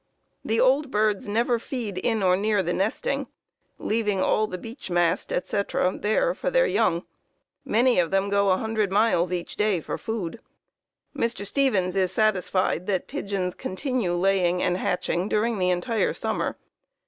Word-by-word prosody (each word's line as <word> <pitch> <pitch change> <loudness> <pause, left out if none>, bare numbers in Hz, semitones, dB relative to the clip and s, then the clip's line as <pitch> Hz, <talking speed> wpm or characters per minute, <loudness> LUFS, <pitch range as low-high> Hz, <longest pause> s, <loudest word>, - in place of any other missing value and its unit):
The 225 +1 0
old 270 +2 +3
birds 210 -3 0
never 235 +3 +1
feed 225 -7 -4
in 220 0 0
or 180 -1 +4
near 205 0 +1
the 175 0 -1
nesting, 220 - -1 0.5
leaving 210 -3 0
all 215 +3 +2
the 185 - -5
beech 225 +1 -9
mast, 175 0 +1
etc., 185 -1 0
there 360 - +1
for - - -2
their - - +3
young. 190 - +1 0.6
Many 240 0 +3
of 170 -2 +2
them 195 +1 +1
go 200 0 +2
100 215 +2 +1
miles 195 -4 +2
each 175 -1 -4
day 210 -4 +2
for - - -5
food. 220 -2 -4 0.8
Mr. 230 -4 -2
Stevens 200 -7 +1
is 185 -2 +1
satisfied 185 -4 +1
that 190 -3 -1
pigeons 200 -9 -3
continue 225 -3 -2
laying 180 -1 +2
and 180 - +1
hatching 180 +1 -1
during 220 0 0
the 180 0 +2
entire 180 +6 0
summer. - - -2
200 Hz, 155 wpm, -25 LUFS, 185-225 Hz, 0.8 s, or